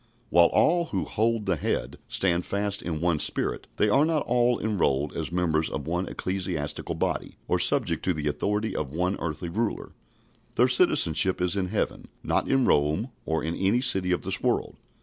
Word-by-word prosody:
While 85 Hz, -2 st, +6 dB
all 170 Hz, +1 st, +3 dB
who 165 Hz, -, -2 dB
"hold 115 Hz, -1 st, 0 dB
the 95 Hz, -3 st, +1 dB
Head" -, -, -2 dB
stand 90 Hz, -2 st, +1 dB
fast 100 Hz, 0 st, -2 dB
in 80 Hz, -3 st, -4 dB
one 85 Hz, -3 st, +1 dB
spirit, -, -, 0 dB
they 105 Hz, -, +2 dB
are 135 Hz, +8 st, +4 dB
not 155 Hz, -2 st, 0 dB
all 120 Hz, 0 st, +2 dB
enrolled 75 Hz, -10 st, 0 dB
as -, -, -3 dB
members 80 Hz, -3 st, 0 dB
of -, -, -5 dB
one 90 Hz, +3 st, -2 dB
ecclesiastical 90 Hz, -6 st, -3 dB
body, -, -, -3 dB
or -, -, +1 dB
subject -, -, +2 dB
to 90 Hz, -, +2 dB
the 75 Hz, -1 st, -3 dB
authority 105 Hz, +8 st, -1 dB
of 75 Hz, -, -2 dB
one 90 Hz, +5 st, -1 dB
earthly 85 Hz, +1 st, -4 dB
ruler. 110 Hz, +5 st, -3 dB, 0.6 s
Their -, -, +4 dB
citizenship 85 Hz, +4 st, +3 dB
is 90 Hz, +1 st, +1 dB
in 95 Hz, -2 st, -1 dB
heaven; 105 Hz, +3 st, -2 dB, 0.2 s
not -, -, 0 dB
in 135 Hz, -2 st, +3 dB
Rome 75 Hz, -, +1 dB, 0.2 s
or 80 Hz, -2 st, -1 dB
in 80 Hz, +2 st, -2 dB
any 100 Hz, +6 st, +1 dB
city 95 Hz, -8 st, +2 dB
of 90 Hz, -, 0 dB
this -, -, -2 dB
world. -, -, 0 dB
90 Hz, 185 wpm, -26 LUFS, 80-110 Hz, 0.6 s, While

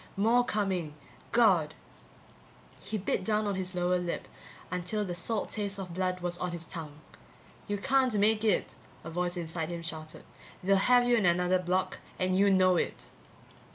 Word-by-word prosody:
More 230 Hz, +5 st, +4 dB
coming. 190 Hz, -9 st, -1 dB, 0.4 s
God! 185 Hz, -10 st, +4 dB, 1.0 s
He 220 Hz, -, -4 dB
bit 190 Hz, -1 st, -1 dB
down 215 Hz, +1 st, +1 dB
on 205 Hz, -, 0 dB
his 185 Hz, -1 st, -4 dB
lower 180 Hz, 0 st, +1 dB
lip 175 Hz, -1 st, -4 dB, 0.4 s
until 180 Hz, +4 st, -2 dB
the 180 Hz, -, -4 dB
salt 200 Hz, +5 st, -2 dB
taste 205 Hz, -2 st, -2 dB
of 185 Hz, -3 st, -6 dB
blood 185 Hz, 0 st, -1 dB
was 175 Hz, 0 st, -2 dB
on 180 Hz, -1 st, -3 dB
his 170 Hz, -1 st, -5 dB
tongue. 155 Hz, -3 st, -8 dB, 0.7 s
You 205 Hz, -1 st, -1 dB
can't 255 Hz, +2 st, +2 dB
make 215 Hz, +1 st, +3 dB
it, 215 Hz, -4 st, +1 dB, 0.3 s
a 165 Hz, -, -7 dB
voice 175 Hz, +1 st, -2 dB
inside 165 Hz, -1 st, -3 dB
him 170 Hz, -1 st, -5 dB
shouted, 155 Hz, -1 st, -6 dB, 0.4 s
they'll 195 Hz, +2 st, +4 dB
have 245 Hz, +4 st, +4 dB
you 240 Hz, -1 st, +4 dB
in 205 Hz, -5 st, +3 dB
another 180 Hz, +1 st, +3 dB
block 185 Hz, +1 st, -1 dB, 0.2 s
and 185 Hz, 0 st, +1 dB
you 200 Hz, +1 st, +4 dB
know 185 Hz, -1 st, +4 dB
it! -, -, -3 dB
185 Hz, 170 wpm, -30 LUFS, 175-205 Hz, 1.0 s, More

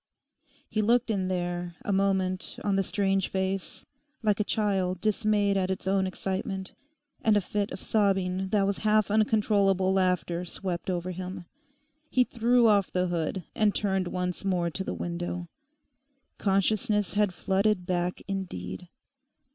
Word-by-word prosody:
He 215 Hz, -1 st, 0 dB
looked 235 Hz, +2 st, +3 dB
in 190 Hz, -3 st, 0 dB
there 175 Hz, -1 st, -2 dB
a 200 Hz, -, 0 dB
moment 190 Hz, -1 st, 0 dB
on 200 Hz, -1 st, +1 dB
the 195 Hz, -, +3 dB
strange 195 Hz, 0 st, +1 dB
face, 190 Hz, 0 st, -3 dB, 0.4 s
like 210 Hz, -2 st, +2 dB
a -, -, +3 dB
child 195 Hz, -4 st, 0 dB
dismayed 210 Hz, -1 st, +2 dB
at 185 Hz, -1 st, 0 dB
its 190 Hz, -1 st, -3 dB
own 190 Hz, 0 st, +2 dB
excitement, 190 Hz, +1 st, -3 dB, 0.5 s
and 215 Hz, -2 st, +4 dB
a -, -, +5 dB
fit 205 Hz, +1 st, -2 dB
of -, -, -6 dB
sobbing 190 Hz, -3 st, +1 dB
that 200 Hz, -1 st, +2 dB
was 200 Hz, 0 st, -1 dB
half 215 Hz, -1 st, +2 dB
uncontrollable 205 Hz, -3 st, +3 dB
laughter 180 Hz, -2 st, +1 dB
swept 175 Hz, 0 st, -4 dB
over 180 Hz, 0 st, -2 dB
him. 185 Hz, 0 st, -6 dB, 0.6 s
He 255 Hz, -, +4 dB
threw 240 Hz, 0 st, +3 dB
off 205 Hz, -3 st, +4 dB
the 180 Hz, 0 st, 0 dB
hood 175 Hz, +2 st, -2 dB
and 210 Hz, -2 st, +2 dB
turned 190 Hz, -3 st, 0 dB
once 180 Hz, 0 st, -2 dB
more 180 Hz, -3 st, 0 dB
to 190 Hz, -, -2 dB
the -, -, -4 dB
window. 175 Hz, 0 st, -4 dB, 0.9 s
Consciousness 210 Hz, +1 st, +1 dB
had 205 Hz, -1 st, +2 dB
flooded 190 Hz, +1 st, +1 dB
back 180 Hz, 0 st, -1 dB
indeed. 175 Hz, -, -5 dB
190 Hz, 145 wpm, -28 LUFS, 180-205 Hz, 0.9 s, a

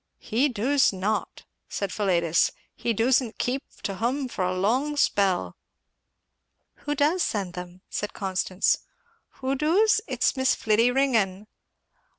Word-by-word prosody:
"He 255 Hz, +7 st, 0 dB
doos 260 Hz, +4 st, +2 dB
not," 200 Hz, +3 st, -3 dB, 0.2 s
said 200 Hz, -2 st, -3 dB
Philetus; 170 Hz, -5 st, +2 dB, 0.2 s
"he 235 Hz, -, -2 dB
doosn't 235 Hz, +1 st, +1 dB
keep 260 Hz, +2 st, -1 dB, 0.2 s
to 200 Hz, -, -2 dB
hum 255 Hz, +7 st, -1 dB
for 190 Hz, -, -3 dB
a 180 Hz, 0 st, 0 dB
long 260 Hz, +10 st, +1 dB
spell." 195 Hz, -9 st, +1 dB, 1.2 s
"Who 295 Hz, -, -3 dB
does 300 Hz, +6 st, +2 dB
send 195 Hz, -, -1 dB
them 180 Hz, -1 st, -6 dB
then?" 180 Hz, +1 st, -19 dB
said 210 Hz, -, -4 dB
Constance. 190 Hz, -1 st, 0 dB, 0.6 s
"Who 265 Hz, +1 st, +1 dB
doos? 360 Hz, +11 st, +3 dB
It's -, -, +1 dB
Miss 260 Hz, -1 st, +2 dB
Fliddy 225 Hz, +2 st, +3 dB
Ringgan." 220 Hz, -7 st, +1 dB
225 Hz, 135 wpm, -26 LUFS, 190-270 Hz, 1.2 s, doos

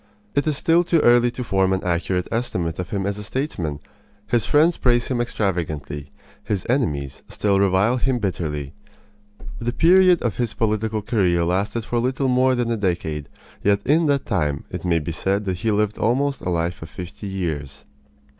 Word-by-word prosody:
It 140 Hz, +2 st, +1 dB
is 150 Hz, -2 st, +1 dB
still 170 Hz, +1 st, +3 dB
too 170 Hz, -1 st, +2 dB
early 120 Hz, 0 st, +5 dB
to 125 Hz, +1 st, -5 dB
form 95 Hz, -4 st, +1 dB
an 95 Hz, -, -1 dB
accurate 90 Hz, +1 st, -1 dB
estimate 90 Hz, -9 st, -2 dB
of 90 Hz, -, -4 dB
him 100 Hz, -2 st, -2 dB
as 100 Hz, +1 st, -2 dB
a -, -, -6 dB
statesman. 100 Hz, -, -3 dB, 0.5 s
His 120 Hz, 0 st, 0 dB
friends 160 Hz, +3 st, +4 dB
praise 120 Hz, -1 st, +2 dB
him 125 Hz, -2 st, 0 dB
extravagantly. 80 Hz, -, -3 dB, 0.3 s
His 105 Hz, -3 st, -2 dB
enemies 75 Hz, -, -1 dB
still 100 Hz, -2 st, +1 dB
revile 100 Hz, +5 st, +3 dB
him 130 Hz, 0 st, +1 dB
bitterly. 75 Hz, -, -3 dB, 0.9 s
The 120 Hz, +1 st, -1 dB
period 180 Hz, +2 st, +5 dB
of 115 Hz, -5 st, -1 dB
his 120 Hz, -3 st, -2 dB
political 110 Hz, -1 st, 0 dB
career 90 Hz, -6 st, +2 dB
lasted 100 Hz, +6 st, -1 dB
for 120 Hz, -, -1 dB
little 130 Hz, +2 st, 0 dB
more 130 Hz, +1 st, +3 dB
than 120 Hz, -1 st, -1 dB
a 115 Hz, -, 0 dB
decade, 80 Hz, -7 st, -2 dB, 0.3 s
yet 100 Hz, 0 st, +3 dB
in 155 Hz, +3 st, +3 dB
that 140 Hz, -2 st, +1 dB
time 75 Hz, -, -1 dB
it -, -, -5 dB
may 85 Hz, -2 st, +2 dB
be 80 Hz, +1 st, -3 dB
said 100 Hz, +5 st, -1 dB
that 95 Hz, -2 st, -1 dB
he 110 Hz, -, -1 dB
lived 105 Hz, 0 st, 0 dB
almost 135 Hz, +4 st, +1 dB
a -, -, -3 dB
life 85 Hz, 0 st, -1 dB
of 80 Hz, -, -8 dB
fifty 90 Hz, +3 st, -8 dB
years. 80 Hz, -8 st, -4 dB
105 Hz, 185 wpm, -22 LUFS, 90-120 Hz, 0.9 s, early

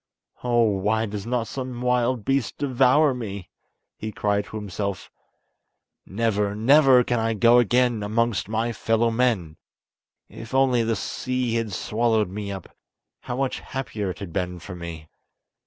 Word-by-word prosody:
"Oh, 120 Hz, -1 st, +3 dB
why 105 Hz, +1 st, +1 dB
does 105 Hz, 0 st, -6 dB
not 120 Hz, -2 st, -1 dB
some 130 Hz, -2 st, -5 dB
wild 125 Hz, -2 st, +1 dB
beast 135 Hz, -4 st, 0 dB
devour 135 Hz, +2 st, +3 dB
me?" 100 Hz, -6 st, -6 dB, 0.5 s
he 110 Hz, -, -6 dB
cried 105 Hz, 0 st, 0 dB
to -, -, -11 dB
himself; 100 Hz, -1 st, -4 dB, 1.0 s
"never, 105 Hz, -1 st, 0 dB
never, 130 Hz, +2 st, +6 dB
can 120 Hz, -1 st, 0 dB
I 115 Hz, 0 st, 0 dB
go 120 Hz, +3 st, +6 dB
again 120 Hz, -1 st, +2 dB
amongst 110 Hz, 0 st, 0 dB
my 115 Hz, +2 st, 0 dB
fellow 115 Hz, 0 st, +1 dB
men! 110 Hz, -10 st, 0 dB, 0.7 s
If 115 Hz, +3 st, -8 dB
only 130 Hz, -3 st, +3 dB
the 115 Hz, 0 st, 0 dB
sea 125 Hz, +3 st, -2 dB
had 115 Hz, -2 st, -1 dB
swallowed 110 Hz, 0 st, 0 dB
me 100 Hz, 0 st, -5 dB
up, 95 Hz, -, -9 dB, 0.4 s
how 125 Hz, -, -5 dB
much 135 Hz, -1 st, -1 dB
happier 110 Hz, -7 st, -4 dB
it 90 Hz, -, -5 dB
had 100 Hz, -4 st, -8 dB
been 90 Hz, -2 st, -2 dB
for 90 Hz, +1 st, -9 dB
me!" 85 Hz, -3 st, -8 dB
115 Hz, 150 wpm, -24 LUFS, 100-125 Hz, 1.0 s, never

